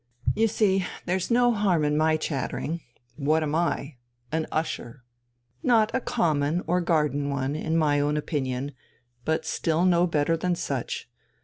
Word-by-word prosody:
You 225 +2 +3
see, 195 -4 +2 0.2
there's 180 +1 -1
no 245 0 +4
harm 195 -8 +2
in 150 0 +1
my 155 +1 +3
chattering. 155 +2 -3 0.4
What 155 +2 +2
am 150 -1 -2
I? 155 -4 -1 0.3
An 160 0 -1
usher. 135 -5 -3 0.6
Not 225 -3 +3
a - - +2
common 155 -3 +1
or 180 +2 +1
garden 150 -4 +1
one, 140 0 -1
in 160 +1 -1
my 150 -3 +3
own 145 +1 +1
opinion, 140 -3 -2 0.5
but 160 0 0
still 165 +2 +1
no 175 -1 +4
better 160 0 +1
than 175 +2 0
such. 475 - -3
160 Hz, 150 wpm, -26 LUFS, 145-180 Hz, 0.6 s, no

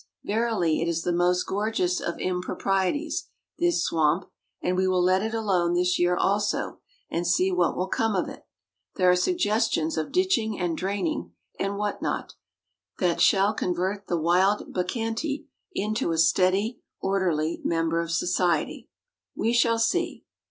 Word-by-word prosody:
Verily 210 -8 0
it 165 - 0
is 165 -1 -1
the 175 - 0
most 180 +1 +2
gorgeous 195 -3 0
of 170 - -3
improprieties, 195 - -1 0.3
this 345 -1 +2
swamp; 165 +3 +1 0.3
and 180 - -1
we 185 +1 +2
will 185 -1 +2
let 185 +1 +3
it 220 +1 -2
alone 185 -6 +1
this 180 +1 +2
year 175 0 +3
also, 205 +1 0 0.3
and 170 +1 -1
see 190 +1 +3
what 180 -2 +1
will 185 - 0
come 225 +2 0
of 180 - 0
it. - - -11 0.5
There 180 -1 +4
are - - +4
suggestions 215 - +1
of 155 - -2
ditching 360 - +1
and 175 -2 -1
draining, 175 - -2 0.3
and 200 +1 -1
what 205 0 -2
not, - - -3 0.6
that 175 -2 +1
shall 200 +2 +4
convert 190 +1 -2
the 175 - 0
wild 180 +5 +2
bacchante 225 - -2 0.3
into 215 - -1
a 165 - -1
steady, 190 +7 +2 0.2
orderly 175 -5 0
member 165 0 +1
of 170 - -5
society. 175 -1 0 0.5
We 230 +2 0
shall 230 -1 +3
see. 350 +10 0
185 Hz, 150 wpm, -26 LUFS, 175-215 Hz, 0.6 s, There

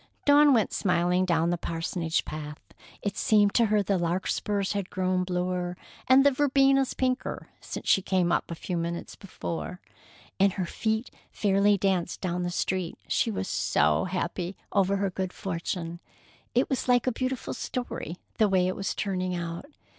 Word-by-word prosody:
Dawn 290 0 +7
went 230 -5 +3
smiling 180 0 +2
down 170 -1 +2
the 175 - -1
parsonage 165 0 -2
path. 150 -1 -6 0.4
It 200 -1 -2
seemed 205 -2 +3
to 235 -2 +4
her 210 -1 +2
the 195 -1 +1
larkspurs 190 +3 -1
had 200 -2 -3
grown 185 -2 0
bluer 180 0 -2 0.3
and 265 +2 +6
the 285 - +7
verbenas 275 -1 +3
pinker 255 -1 -2
since - - -7
she 195 - +5
came 185 -2 +1
up - - 0
a 170 - -4
few 175 +2 -4
minutes 170 +1 -4
before, 180 -2 -6 0.6
and 195 -1 +4
her 190 -2 -2
feet 220 +6 -2 0.2
fairly 200 0 +3
danced 185 -3 0
down 180 -1 -2
the 175 - -1
street, 180 -1 -2
she - - +1
was 95 -3 -3
so 75 0 +2
happy 180 0 -3
over 195 -1 +2
her 195 -1 0
good 185 0 -3
fortune. 170 -2 -4 0.6
It 250 - +3
was 265 - -2
like 245 -1 +4
a 255 - +2
beautiful 255 +1 -3
story, 240 -9 -4 0.2
the 215 -2 +5
way 185 -2 +3
it 185 - -1
was 195 - -3
turning 185 -2 -1
out. 170 +8 -5
185 Hz, 170 wpm, -27 LUFS, 175-210 Hz, 0.6 s, Dawn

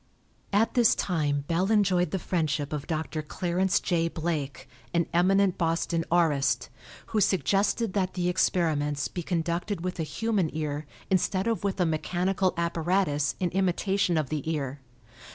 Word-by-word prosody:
At 210 +3 +2
this 240 -3 +5
time 145 -5 -1
Bell 180 +4 +1
enjoyed 185 -5 +3
the 190 - -1
friendship 155 -4 -1
of 150 -2 -4
Dr. 160 -1 -2
Clarence 180 +4 0
J. 165 -2 0
Blake, 160 -4 -3 0.3
an 170 -1 +3
eminent 190 +2 +3
Boston 165 0 0
aurist, 140 -8 +2 0.4
who 215 - +3
suggested 195 - +1
that 190 -2 -1
the 180 -1 0
experiments 150 -5 +1
be 175 - -5
conducted 170 +2 -2
with 180 0 -4
a - - +1
human 190 +3 0
ear 150 -1 -3 0.2
instead 190 +1 +1
of 230 -2 -1
with 195 -1 -1
a 180 - +3
mechanical 180 +4 0
apparatus 170 -3 0
in 180 -2 0
imitation 190 -1 +1
of 155 -4 -1
the 155 0 -3
ear. 140 -3 -3
170 Hz, 150 wpm, -27 LUFS, 155-190 Hz, 0.4 s, this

